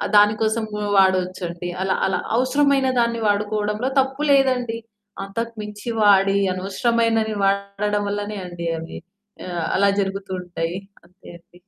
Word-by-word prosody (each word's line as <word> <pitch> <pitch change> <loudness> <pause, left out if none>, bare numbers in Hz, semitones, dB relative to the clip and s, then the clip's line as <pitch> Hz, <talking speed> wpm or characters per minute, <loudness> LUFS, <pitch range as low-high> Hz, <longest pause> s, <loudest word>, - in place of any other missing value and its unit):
దాని 210 +1 +7
కోసం 220 +1 +1 0.3
వాడొచ్చండి. 185 -2 +1
అలా 190 0 +1
అలా 190 - 0 0.2
అవసరమైన 270 +2 +2
దాన్ని 235 0 +1
వాడుకోవడంలో 210 +3 0
తప్పు 270 +2 -1
లేదండి. 255 -4 +2 0.5
అంతకుమించి 210 +1 -6
వాడి 195 -1 +5 0.2
అనవసరమైనవి 225 +3 0
వాడడం 200 +1 0
వల్లనే 205 +1 -3
అండి 175 -1 -7
అవి 165 +1 -7 0.5
ఆహ్, 175 -2 -3
అలా 200 +1 +4
జరుగుతూ 195 0 -4
ఉంటాయి. 175 0 -4 0.3
అంతే 180 +2 -17
అండి. 175 +1 -23
205 Hz, 120 wpm, -22 LUFS, 190-230 Hz, 0.5 s, దాని